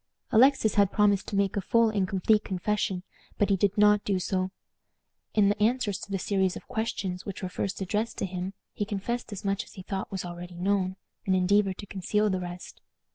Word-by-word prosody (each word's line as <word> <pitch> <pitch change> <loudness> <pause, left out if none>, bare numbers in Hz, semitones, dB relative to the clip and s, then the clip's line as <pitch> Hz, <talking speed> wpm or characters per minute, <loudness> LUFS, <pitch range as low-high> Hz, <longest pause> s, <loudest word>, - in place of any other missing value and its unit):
Alexis 240 -1 +5
had 200 -2 +4
promised 205 -2 +3
to - - -4
make 200 -1 +1
a 200 - 0
full 230 +3 +3
and 200 -3 0
complete 210 +3 +2
confession, 190 0 -1 0.3
but 205 -1 +2
he - - +5
did 200 +2 +1
not 210 0 +5
do 195 -2 +1
so. 185 +1 -1 0.9
In 210 -2 +5
the 205 +1 0
answers 220 -3 +1
to - - -9
the 195 - 0
series 190 -1 0
of - - -9
questions 210 -6 -3
which 200 -1 -7
were 185 - -2
first 195 +2 -3
addressed 210 +4 -1
to - - -1
him, 185 +1 -4 0.2
he - - -2
confessed 210 +4 -3
as 200 0 -7
much 200 +2 0
as - - -16
he 185 - -9
thought 190 0 -4
was 190 -2 -3
already 175 0 -8
known, 185 +1 0 0.3
and 190 - +3
endeavored 190 +1 +3
to 205 - -7
conceal 210 +2 0
the 185 - 0
rest. 175 0 -8
200 Hz, 210 wpm, -28 LUFS, 185-210 Hz, 0.9 s, Alexis